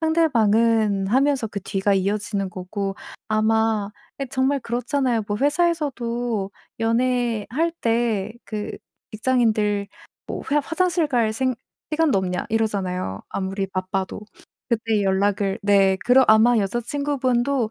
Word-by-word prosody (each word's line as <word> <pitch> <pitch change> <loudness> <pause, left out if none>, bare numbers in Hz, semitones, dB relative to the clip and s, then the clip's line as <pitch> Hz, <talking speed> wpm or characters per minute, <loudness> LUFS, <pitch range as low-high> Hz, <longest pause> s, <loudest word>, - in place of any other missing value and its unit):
상대방은' 230 -10 +2
하면서 265 +1 +2
그 205 -2 -6
뒤가 195 +1 0
이어지는 200 0 -1
거고 195 +2 -4 0.3
아마 220 -1 +1 0.3
예 275 - -2
정말 265 +2 +1
그렇잖아요. 245 0 -1
뭐 205 - -1
회사에서도 255 - 0 0.3
연애할 245 +5 0
때 225 -3 0
그 210 -1 -5 0.4
직장인들 215 -4 +1 0.4
뭐 - - -5
회사 295 +1 +3
화장실 345 0 +1
갈 235 -6 +1
생 255 +3 0 0.4
시간도 305 -8 +3
없냐 180 -1 -2
이러잖아요, 190 - -1
아무리 195 0 -3
바빠도. 190 +1 -3 0.5
그때 225 -3 +1
연락을 195 0 +1
네. 195 -1 +4
그러 255 +2 +6
아마 220 +2 +6
여자친구분도 250 +2 0
225 Hz, 275 characters per minute, -23 LUFS, 200-255 Hz, 0.5 s, 그러